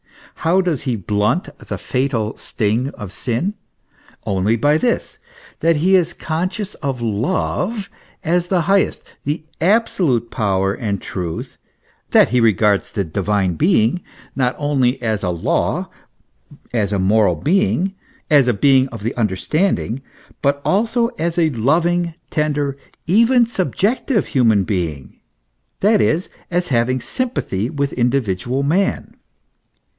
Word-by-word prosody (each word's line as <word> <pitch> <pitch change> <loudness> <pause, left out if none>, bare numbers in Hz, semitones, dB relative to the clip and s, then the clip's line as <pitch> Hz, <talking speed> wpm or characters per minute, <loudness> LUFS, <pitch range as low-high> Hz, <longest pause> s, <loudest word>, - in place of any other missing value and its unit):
How 180 +4 +4
does 175 -7 -1
he 130 -4 -1
blunt 105 - -1
the - - -6
fatal 125 -5 -1
sting 115 +5 -1
of 105 -5 -8
sin? 130 - -2 0.7
Only 100 +3 +1
by 145 +6 +2
this; 240 +4 -1 0.4
that 165 0 +3
he 180 +6 +3
is 175 -2 +2
conscious 185 +6 -3
of 135 -5 -3
love 185 - -1 0.3
as 175 +1 +1
the 180 -1 +2
highest, 195 +4 +1 0.2
the 150 +3 -2 0.2
absolute 170 - +2
power 95 -2 0
and 100 -3 -3
truth, 90 -3 -5 0.5
that - - +5
he 125 0 +2
regards 105 -2 +2
the 100 - -1
Divine 95 +2 0
Being 160 - +2 0.3
not 125 -2 +1
only 140 -3 +1
as 110 -3 0
a 90 - -1
law, 85 -2 -1 0.8
as 105 -4 0
a 100 - +1
moral 100 +3 +3
being, 190 +2 +1 0.3
as 145 -4 +5
a 125 - +3
being 135 +4 +4
of 115 -5 -9
the 115 - -1
understanding; 120 - 0 0.4
but 140 0 +1
also 230 +4 +2
as 170 0 -1
a 160 -2 +3
loving, 170 +7 +1 0.2
tender, 145 -3 0 0.3
even 235 +7 +4
sub 195 -6 -3
jective 225 +2 +1
human 115 -7 +3
being 85 -9 -3 0.6
(that 210 +1 +4
is, 170 +4 +1 0.2
as 180 0 0
having 130 0 +1
sympathy 125 - -2
with 140 -2 -2
indi 125 +2 +2
vidual 120 +6 -2
man.) 190 +7 0
140 Hz, 135 wpm, -19 LUFS, 110-175 Hz, 0.8 s, that